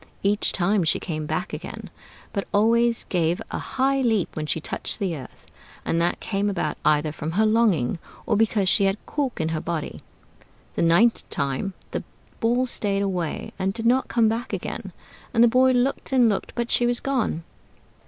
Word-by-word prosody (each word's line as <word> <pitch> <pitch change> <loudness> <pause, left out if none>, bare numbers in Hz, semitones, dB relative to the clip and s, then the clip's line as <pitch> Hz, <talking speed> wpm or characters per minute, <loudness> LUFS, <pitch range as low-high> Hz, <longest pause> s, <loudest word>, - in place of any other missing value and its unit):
Each 205 +1 +2
time 195 +1 +2
she 160 - +2
came 155 -3 -4
back 180 - -3
again, - - -7 0.4
but 200 - -2
always 230 +3 +3
gave 175 0 +1
a - - -2
high 270 +1 0
leap 225 -7 +1
when 155 -1 -3
she 160 - 0
touched - - -3
the 190 -6 -1
earth; 130 -4 -11 0.4
and 165 - +1
that 175 - 0
came 200 -1 -1
about 195 -4 -2
either 150 0 +2
from 155 +1 -5
her 215 +4 +3
longing, 210 - +2 0.3
or 220 - +1
because 210 -2 +2
she 200 +2 +5
had 195 0 +2
a - - -31
cork 280 -4 -2
in 160 0 0
her 160 -1 -2
body. 165 -3 -4 0.7
The - - -2
ninth 175 +8 +3
time 140 +7 -2 0.2
the - - -3 0.4
Ball 240 +3 +2
stayed 200 -5 0
away 180 -5 -3
and 190 +1 0
did 230 -1 -4
not 255 +3 +3
come 230 -2 +3
back 230 +2 -2
again; - - -4 0.4
and 230 - +6
the - - +7
boy 255 +2 +4
looked 255 +2 0
and 255 -3 +5
looked, 205 -3 -1
but 240 0 -2
she 240 - +3
was 240 0 +1
gone. 250 -11 -1
205 Hz, 190 wpm, -24 LUFS, 170-235 Hz, 0.7 s, the